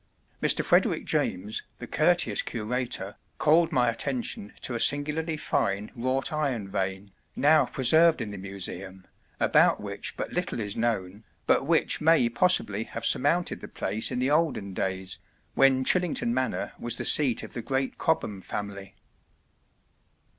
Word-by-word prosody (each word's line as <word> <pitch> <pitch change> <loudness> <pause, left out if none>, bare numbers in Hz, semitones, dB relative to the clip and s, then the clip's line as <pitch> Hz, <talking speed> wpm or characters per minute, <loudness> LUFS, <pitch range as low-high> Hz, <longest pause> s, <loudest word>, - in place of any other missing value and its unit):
Mr. - - +2
Frederick - - +2
James, 100 +4 -1 0.2
the - - -8
courteous - - +2
curator, 115 -3 -4 0.2
called 165 +2 +3
my 125 -1 +2
attention 120 -3 -2
to 130 - -2
a 120 - -2
singularly 150 +4 +2
fine 105 -9 -1
wrought 130 +4 -1
iron 135 -9 -2
vane, 95 0 -4 0.2
now 150 -2 +4
preserved 160 +6 +4
in 105 - -4
the 100 - -7
Museum, 95 -1 -6 0.3
about - - +3
which - - -4
but - - -5
little - - -2
is 105 -2 -3
known, 105 -3 -2 0.2
but 135 - +2
which 165 -1 +2
may 155 -5 +4
possibly 115 - +1
have 115 0 -6
surmounted 165 +9 +2
the - - -8
place 105 +3 -2
in - - -4
the 130 +3 0
olden 145 - 0
days 95 -1 -3 0.3
when 135 -1 +3
Chillington 175 -9 +1
Manor 130 +1 -2
was 120 -1 0
the - - -2
seat 135 -6 +4
of - - -10
the 120 - -5
great 135 +1 -3
Cobham 105 -11 -1
family. 100 0 -7
120 Hz, 145 wpm, -26 LUFS, 100-145 Hz, 0.3 s, now